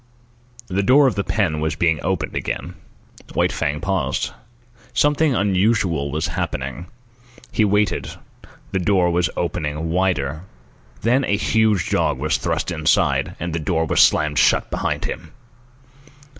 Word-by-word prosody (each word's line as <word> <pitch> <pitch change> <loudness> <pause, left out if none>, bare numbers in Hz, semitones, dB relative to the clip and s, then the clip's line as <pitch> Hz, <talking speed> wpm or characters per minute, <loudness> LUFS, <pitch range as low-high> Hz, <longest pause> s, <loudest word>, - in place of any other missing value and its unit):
The 95 +1 0
door 135 +8 +5
of 130 - +3
the 100 - -2
pen 90 -7 0
was 80 0 -1
being 80 -2 +1
opened 90 -4 -2
again. 90 - -3 0.6
White - - +2
Fang 75 +2 -2
paused. 85 -7 -1 0.6
Something 145 -1 +3
unusual 95 -6 +1
was 75 +2 -2
happening. 65 +6 -4 0.6
He 110 - +2
waited. 105 0 +1 0.6
The 95 - 0
door 90 -1 +2
was 85 -1 +1
opened 80 -2 -2
wider. 80 -5 0 0.6
Then 125 +4 +2
a 100 -5 +1
huge 110 -4 +1
dog - - +1
was - - 0
thrust - - -2
inside, 80 -3 +1
and 85 0 -4
the 85 - -1
door 80 +1 0
was - - +3
slammed 75 -1 +3
shut - - +3
behind - - -2
him. 85 -1 -6
90 Hz, 140 wpm, -21 LUFS, 80-100 Hz, 0.6 s, door